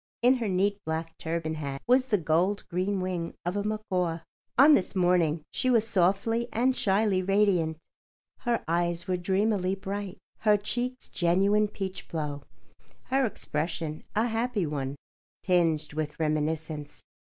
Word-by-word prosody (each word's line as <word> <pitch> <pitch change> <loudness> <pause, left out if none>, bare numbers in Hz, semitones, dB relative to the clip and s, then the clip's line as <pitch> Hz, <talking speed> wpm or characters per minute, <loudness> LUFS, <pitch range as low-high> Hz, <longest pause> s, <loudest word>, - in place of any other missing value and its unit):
In 255 +2 +5
her 230 -3 -2
neat 200 +2 +1
black 160 +1 -3
turban 160 -1 -2
hat 140 -3 -4
was 255 +1 +4
the 215 -5 +3
gold 175 +5 +1
green 185 +2 -1
wing 180 -2 -3
of 175 +2 -1
a 205 - 0
macaw. 185 -6 -1 0.4
On 285 +4 +8
this 200 -5 +2
morning 175 -4 +2
she 255 - 0
was 225 -3 +3
softly 200 +5 +2
and 250 +3 +2
shyly 195 -2 +2
radiant. 185 -5 +2 0.6
Her 240 -2 -1
eyes 170 +1 0
were 185 - +1
dreamily 190 +1 +1
bright, 195 0 -5 0.2
her 210 -1 +4
cheeks 245 +5 -3
genuine 195 +4 +2
peachblow, 170 -7 -5 0.7
her 265 0 +3
expression 155 -4 -3
a 220 +2 +3
happy 230 -3 0
one, 140 -2 -3 0.5
tinged 165 -5 +1
with 150 0 -4
reminiscence. 155 -1 -2
185 Hz, 140 wpm, -28 LUFS, 160-210 Hz, 0.7 s, On